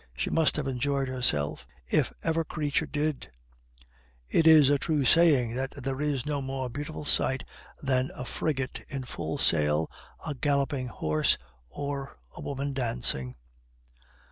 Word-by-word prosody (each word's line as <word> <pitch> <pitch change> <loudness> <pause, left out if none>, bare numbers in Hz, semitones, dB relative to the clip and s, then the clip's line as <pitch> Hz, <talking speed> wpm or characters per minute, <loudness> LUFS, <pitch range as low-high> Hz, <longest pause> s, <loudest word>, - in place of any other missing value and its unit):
She - - -1
must 160 -2 +3
have 150 - -1
enjoyed 135 +1 0
herself, 75 - 0 0.2
if - - +2
ever 165 0 +1
creature 150 -2 -1
did! 150 -1 -2 1.0
It 160 - +3
is 155 -3 +8
a 145 - +3
true 150 -3 0
saying 140 -8 +5
that 130 +2 -3
there 135 +1 -2
is 145 -4 0
no 145 -2 -1
more 130 -1 -3
beautiful 150 +3 -5
sight 130 -2 +1 0.4
than 130 -1 +1
a 125 - -5
frigate 135 -1 -2
in 135 -1 -4
full 135 +3 -4
sail, 75 - +3 0.3
a 150 - -2
galloping 140 -2 0
horse, 75 -9 +1 0.3
or 140 - -5 0.2
a - - -8
woman 140 0 -3
dancing." 65 - -1
135 Hz, 145 wpm, -28 LUFS, 125-145 Hz, 1.0 s, is